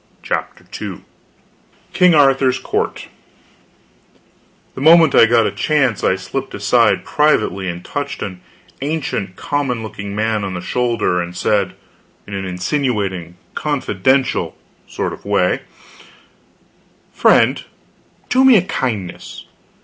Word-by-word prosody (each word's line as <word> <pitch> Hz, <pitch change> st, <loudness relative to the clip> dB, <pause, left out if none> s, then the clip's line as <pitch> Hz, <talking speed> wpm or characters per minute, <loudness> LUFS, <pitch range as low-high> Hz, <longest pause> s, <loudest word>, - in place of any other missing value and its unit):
CHAPTER -, -, -4 dB, 0.2 s
II -, -, -6 dB, 0.9 s
KING 180 Hz, -3 st, +5 dB
ARTHUR'S 135 Hz, -3 st, +4 dB
COURT -, -, -3 dB, 1.7 s
The -, -, -8 dB
moment 160 Hz, +2 st, +6 dB
I 115 Hz, -, +7 dB
got 115 Hz, -1 st, +3 dB
a -, -, 0 dB
chance 140 Hz, -8 st, 0 dB
I 95 Hz, -, +3 dB
slipped 95 Hz, -, -5 dB
aside -, -, +2 dB
privately 105 Hz, -11 st, +1 dB
and 85 Hz, 0 st, -7 dB
touched 145 Hz, -1 st, -4 dB
an 95 Hz, -2 st, -7 dB, 0.4 s
ancient 140 Hz, -10 st, -3 dB
common 135 Hz, -, -2 dB
looking 100 Hz, -2 st, -7 dB
man 110 Hz, 0 st, 0 dB
on 95 Hz, -2 st, -4 dB
the -, -, -3 dB
shoulder 115 Hz, -5 st, 0 dB
and 85 Hz, +1 st, -7 dB
said, 100 Hz, -3 st, 0 dB, 0.5 s
in 100 Hz, -, -10 dB
an 95 Hz, -1 st, -3 dB
insinuating, 95 Hz, -, -2 dB, 0.2 s
confidential 130 Hz, -2 st, 0 dB, 0.7 s
way: -, -, +1 dB, 1.5 s
"Friend, -, -, +3 dB, 0.6 s
do 260 Hz, +1 st, +3 dB
me 260 Hz, -4 st, +7 dB
a 180 Hz, -, +2 dB
kindness. 110 Hz, -, -4 dB
115 Hz, 110 wpm, -18 LUFS, 95-145 Hz, 1.7 s, I